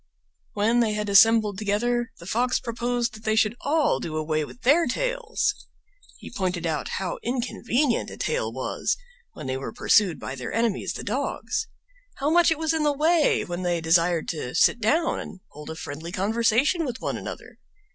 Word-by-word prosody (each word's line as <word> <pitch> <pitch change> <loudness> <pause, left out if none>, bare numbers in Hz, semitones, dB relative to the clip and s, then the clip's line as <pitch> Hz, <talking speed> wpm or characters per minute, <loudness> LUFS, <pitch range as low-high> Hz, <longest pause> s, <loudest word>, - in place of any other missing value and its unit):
When 225 +2 +2
they 225 -3 +2
had 210 -1 -2
assembled 210 0 +5
together 235 +3 0
the - - -12
Fox 245 +7 +1
proposed 240 0 -2
that 215 0 -12
they 215 0 +1
should 220 0 +2
all 300 - +2
do 155 +1 -4
away 155 0 0
with 240 - -11
their 300 +6 +4
tails. - - -1 0.6
He - - -11
pointed 180 -5 -2
out 160 -2 -1
how 185 -2 -3
inconvenient 245 +1 0
a - - -9
tail - - -1
was - - -2 0.4
when - - -9
they 130 0 -2
were 135 - -5
pursued 200 -6 +3
by 130 - -5
their 130 -3 -6
enemies, 230 -3 0
the - - -6
dogs; - - -2 0.5
how 285 +3 -1
much 345 +1 +5
it 320 - +1
was 320 0 0
in 320 - 0
the 300 -1 +3
way 310 +2 +2
when 175 +1 -4
they 175 -1 0
desired 165 0 +2
to 140 -6 -4
sit 240 - +4
down 310 +10 +1
and 185 - -9
hold 150 +1 -11
a 160 - -5
friendly 160 +2 -7
conversation 230 - +2
with 250 -6 -4
one - - -3
another. - - -8
225 Hz, 185 wpm, -25 LUFS, 175-260 Hz, 0.6 s, assembled